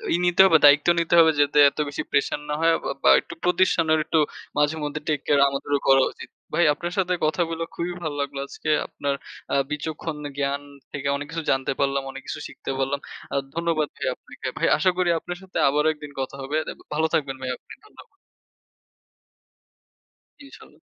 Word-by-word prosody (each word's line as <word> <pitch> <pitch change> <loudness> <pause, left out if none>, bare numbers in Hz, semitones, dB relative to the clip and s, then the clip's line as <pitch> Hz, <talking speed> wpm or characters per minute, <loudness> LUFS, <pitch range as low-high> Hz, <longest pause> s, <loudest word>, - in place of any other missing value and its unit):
ই - - +2
নিতে 175 +1 +5
হবে, 165 -4 +6
দায়িত্ব 145 +3 +6
নিতে 170 +1 -1
হবে 160 -1 +7
যাতে 145 +1 +3
এত 140 - -12
বেশি 145 - -4
pressure 145 - +1
না - - 0
হয় 165 0 +4
আ - - -11 0.2
বা - - +6
একটু - - -10
প্রতিষ্ঠানের 170 -3 +3
একটু 160 - +1 0.4
মাঝেমধ্যে 150 0 0
take 145 -2 0
care 145 -1 +4
আমাদেরও 140 +1 -1
করা 135 -1 +6
উচিত। - - -11 0.2
ভাই 175 - +3
আপনার 175 +4 -5
সাথে 180 -2 +1
কথা 155 +3 0
বইলা 165 0 -3
খুবই 175 +1 -3
ভালো 150 -2 -3
লাগলো 140 -1 -4
আজকে। 155 - -6 0.2
আপনার 140 -1 -3 0.4
আ - - +3 0.2
বিচক্ষণ 155 +1 -4 0.2
জ্ঞান 140 0 -1 0.3
থেকে 140 0 -4
অনেক 145 - -4
কিছু 165 -1 -4
জানতে 135 0 0
পারলাম, 140 0 +1
অনেক 135 0 -9
কিছু - - -5
শিখতে - - -7
পারলাম। 135 +1 0 0.3
আ - - -1 0.2
ধন্যবাদ 165 -3 0
ভাই - - -4
আপনাকে। - - -9
ভাই - - +1
আশা 185 +4 +3
করি 180 -1 +2
আপনার 175 +2 -6
সাথে 190 - -7
আবার 150 +2 +1
একদিন 150 -1 -11
কথা 130 +1 -5
হবে। 145 +3 -2
দে - - -3 0.2
ভালো 160 +1 +2
থাকবেন 135 -3 0
ভাইয়া 130 -1 -2
আপনি, - - -14
ধন্যবাদ। 430 - -16 2.4
ইনশাল্লাহ। 275 - -16
150 Hz, 185 wpm, -24 LUFS, 140-165 Hz, 2.4 s, হবে